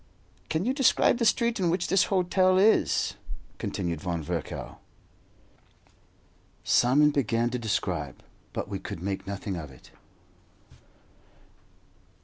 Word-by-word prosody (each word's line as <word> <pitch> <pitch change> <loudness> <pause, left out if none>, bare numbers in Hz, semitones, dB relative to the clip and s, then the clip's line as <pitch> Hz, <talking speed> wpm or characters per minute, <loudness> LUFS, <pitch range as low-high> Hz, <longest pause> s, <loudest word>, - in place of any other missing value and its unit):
"Can 160 +4 -1
you 255 - +1
describe 265 -2 +3
the 230 - +1
street 235 -1 +1
in 180 -3 +1
which 175 +1 0
this 195 +2 +3
hotel 185 0 +2
is?" 210 +4 +3 0.5
continued 85 -4 -3
Von 85 -3 -3
Virchow. - - -5 1.8
Simon 145 +5 +4
began 120 -4 0
to 125 - -2
describe, 90 - -3 0.3
but - - -4
we 100 -1 -5
could 95 -4 -7
make 95 -1 -4
nothing 100 0 -4
of 80 -4 -7
it. 65 -2 -17
120 Hz, 120 wpm, -27 LUFS, -, 1.8 s, Simon